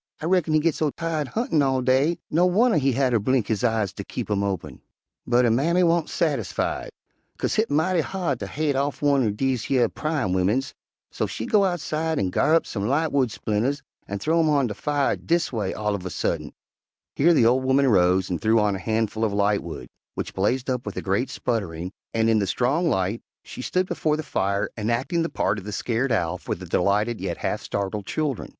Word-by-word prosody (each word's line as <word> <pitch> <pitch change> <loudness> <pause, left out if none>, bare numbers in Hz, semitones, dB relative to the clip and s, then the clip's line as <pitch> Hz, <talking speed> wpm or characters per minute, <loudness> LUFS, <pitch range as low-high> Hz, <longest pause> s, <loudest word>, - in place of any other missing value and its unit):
I - - -5
reckon 170 -3 +2
he - - +5
git 160 +1 +2
so 155 +1 0
tired 160 -1 -3
huntin' 195 - 0
all 130 -2 +1
day, 135 +6 +2
no 175 +4 +4
wunner 215 -1 +3
he 135 -1 +1
hatter 125 -2 +2
blink 125 +2 +1
his 110 +2 -2
eyes 110 -5 +1
ter - - -6
keep - - -5
'em 100 -1 +1
open.' 90 -9 -4 0.5
"But 125 0 +4
her 115 - +3
mammy 165 +10 +2
wan't 170 -2 +2
sassified, - - -1 0.5
'kase - - -1
hit 220 +1 +1
mighty 165 +4 +2
hard 170 -8 -2
ter - - -5
haid 150 -1 -1
off 140 +2 -1
one'r 140 -5 +3
dese 125 +3 -1
yer 130 -3 +3
pryin' 150 - -2
wimmins, 105 +9 0 0.4
so - - -2
she 110 - -5
go 205 -2 +3
outside 160 -3 -1
an' 95 -6 0
ga'rr 155 - +3
up 165 - +2
some 100 -1 -3
lightwood 140 -2 +1
splinters 115 +7 -1 0.2
an' 100 - -3
th'ow 160 +12 +1
'em 160 -1 +3
on 145 -3 +3
de 110 - -3
fire, 145 +5 0
dis 170 -4 -1
away, 105 -5 -1
all 105 -1 -1
uv 95 - -6
a 90 - -4
suddint." - - -3 0.6
Here 170 +4 +4
the 120 - +4
old 125 +3 +3
woman 135 +1 +3
rose 90 -4 +3
and 90 - -3
threw 110 +1 +3
on 105 -2 +1
a - - -5
handful 110 +1 -1
of 110 -2 +1
lightwood, 100 -8 -1 0.3
which - - -4
blazed 120 +7 0
up 125 -2 -1
with - - -7
a - - -3
great 100 +7 0
sputtering, 90 -7 -3 0.2
and 115 0 +1
in 110 -1 +3
the 100 - 0
strong 140 - +1
light 100 -1 0 0.2
she - - -8
stood 185 +8 0
before 155 -4 0
the 155 - -4
fire 100 -7 -1
enacting 120 - -1
the 165 - -1
part 100 - 0
of - - -11
the 105 - -6
scared 120 +5 -1
Owl 90 -5 0
for - - -3
the 95 - -9
delighted 105 +6 +1
yet - - -3
half - - -2
startled 100 0 -3
children. 150 -6 -2
125 Hz, 215 wpm, -24 LUFS, 105-155 Hz, 0.6 s, he